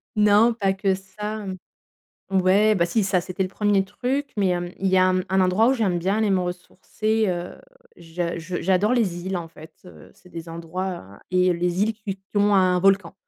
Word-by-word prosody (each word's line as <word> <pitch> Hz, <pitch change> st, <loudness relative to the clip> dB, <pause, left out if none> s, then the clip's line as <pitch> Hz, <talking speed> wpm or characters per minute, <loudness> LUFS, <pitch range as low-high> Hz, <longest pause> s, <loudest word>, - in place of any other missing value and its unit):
Non, 210 Hz, +3 st, +4 dB
pas 195 Hz, -4 st, 0 dB
que 195 Hz, 0 st, 0 dB
ça 210 Hz, +3 st, -6 dB, 0.9 s
ouais, 195 Hz, +3 st, +4 dB
bah 170 Hz, -3 st, +2 dB
si, 210 Hz, +4 st, 0 dB
ça, 190 Hz, -1 st, +1 dB
c'était 185 Hz, +2 st, -3 dB
le 185 Hz, -, -4 dB
1er 205 Hz, 0 st, +1 dB
truc, 255 Hz, +8 st, -3 dB
mais 195 Hz, -, +2 dB
il -, -, +1 dB
y 180 Hz, -, +2 dB
a 175 Hz, -, -2 dB, 0.2 s
il 195 Hz, -, 0 dB
y 190 Hz, -, +3 dB
a 185 Hz, 0 st, +4 dB, 0.2 s
un 190 Hz, 0 st, +2 dB
endroit 185 Hz, +5 st, +3 dB
où 265 Hz, -, +4 dB
j'aime 195 Hz, -8 st, 0 dB
bien 195 Hz, +5 st, 0 dB
aller 215 Hz, -2 st, +1 dB
me 190 Hz, -, +2 dB
ressourcer, 190 Hz, +5 st, -2 dB
heu, 175 Hz, -1 st, -4 dB, 0.4 s
je 170 Hz, +1 st, -4 dB, 0.2 s
j'adore 190 Hz, +5 st, +2 dB
les 185 Hz, -7 st, -1 dB
îles 190 Hz, 0 st, -2 dB
en 170 Hz, -, -6 dB
fait, 160 Hz, 0 st, -14 dB
heu, 80 Hz, -3 st, -14 dB
c'est 180 Hz, -, -21 dB
des 165 Hz, -1 st, -8 dB
endroits 165 Hz, -, -6 dB
et 185 Hz, 0 st, +3 dB
les 175 Hz, +2 st, 0 dB
îles 220 Hz, +1 st, 0 dB
qui 210 Hz, -3 st, -6 dB
qui 190 Hz, -, -36 dB, 0.2 s
ont 205 Hz, 0 st, +3 dB
un 185 Hz, -1 st, +3 dB
volcan 195 Hz, -2 st, +2 dB
190 Hz, 210 wpm, -23 LUFS, 180-210 Hz, 0.9 s, Non